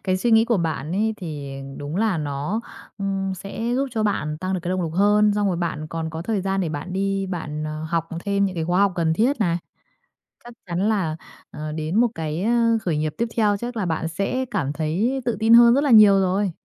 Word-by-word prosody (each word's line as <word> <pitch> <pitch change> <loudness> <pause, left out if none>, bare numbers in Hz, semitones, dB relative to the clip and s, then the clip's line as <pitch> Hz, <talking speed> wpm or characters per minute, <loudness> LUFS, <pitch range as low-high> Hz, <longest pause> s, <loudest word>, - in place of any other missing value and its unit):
Cái 185 -1 +1
suy 235 +5 0
nghĩ 225 0 +6
của 235 -2 +1
bạn 160 -2 -2
ấy 220 +3 0
thì 145 -6 -6 0.2
đúng 145 +4 -5
là 210 -5 +1
nó, 150 +9 -2 0.4
ừm, 195 -1 -2
sẽ 220 +5 -4
giúp 275 +1 0
cho 220 -2 -1
bạn 155 -7 -1
tăng 185 +2 -2
được 180 - -2
cái 175 - -4
động 185 -1 0
lực 160 -1 -3
hơn, 205 +2 +4
xong 205 -1 +1
rồi 180 - 0
bạn 165 -3 -3
còn 160 0 -4
có 160 +1 -5
thời 210 0 -1
gian 195 0 -1
để 170 - -1
bạn 155 +4 -5
đi 195 0 -1
bạn, 155 -4 -4
ờ, 155 0 -5
học 165 0 -1 0.2
thêm 200 0 +1
những 190 -2 -2
cái 165 -1 -2
khóa 175 +3 +1
học 200 -2 +3
cần 165 -1 +1
thiết 235 - +1
này. 170 -4 +2 0.9
Chắc 240 0 -11
chắn 180 +5 0
là, 175 -8 0 0.4
ờ, 155 0 -6
đến 155 +3 -3
một 240 +2 +5
cái 160 +4 -3 0.4
khởi 165 -5 -1
nghiệp 155 0 -1
tiếp 235 - +1
theo 205 -2 +3
chắc 240 +2 -5
là 200 - -1
bạn 160 -1 -1
sẽ 200 +10 -2
cảm 145 - -1
thấy 200 - -1
tự 240 - 0
tin 225 +1 +4
hơn 235 0 +8
rất 280 +3 +2
là 280 - +2
nhiều 210 -3 +8
rồi. 190 +1 +1
190 Hz, 240 wpm, -23 LUFS, 160-210 Hz, 0.9 s, hơn